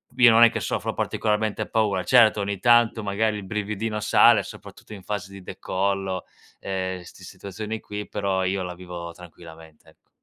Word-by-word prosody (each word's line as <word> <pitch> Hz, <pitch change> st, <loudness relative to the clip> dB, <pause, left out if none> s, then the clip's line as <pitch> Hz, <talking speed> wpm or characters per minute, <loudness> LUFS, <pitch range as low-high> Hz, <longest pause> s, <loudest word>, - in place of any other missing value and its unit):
io 120 Hz, -2 st, +7 dB
non 115 Hz, +1 st, +7 dB
è 115 Hz, -, +8 dB
che -, -, -4 dB
soffro -, -, -2 dB
particolarmente 110 Hz, 0 st, -1 dB
paura. 105 Hz, -4 st, +1 dB
Certo, 115 Hz, -4 st, +5 dB
ogni 100 Hz, -1 st, -3 dB
tanto 120 Hz, -1 st, +4 dB
magari 105 Hz, +2 st, 0 dB
il 100 Hz, -, -7 dB
brividino 105 Hz, +1 st, -3 dB
sale, -, -, +5 dB
soprattutto 110 Hz, -, -12 dB
in 95 Hz, -3 st, -10 dB
fase 100 Hz, -2 st, -5 dB
di 100 Hz, -, -10 dB
decollo, 95 Hz, 0 st, -2 dB, 0.4 s
ehm, 95 Hz, -1 st, -4 dB
st 85 Hz, -, -15 dB
situazioni 105 Hz, +3 st, -7 dB
qui, 105 Hz, 0 st, -7 dB
però 95 Hz, -2 st, -1 dB
io 95 Hz, 0 st, -1 dB
la 90 Hz, 0 st, -5 dB
vivo 90 Hz, -1 st, -8 dB
tranquillamente, 80 Hz, -2 st, -15 dB
ecco. -, -, -28 dB
100 Hz, 170 wpm, -24 LUFS, 95-110 Hz, 0.4 s, è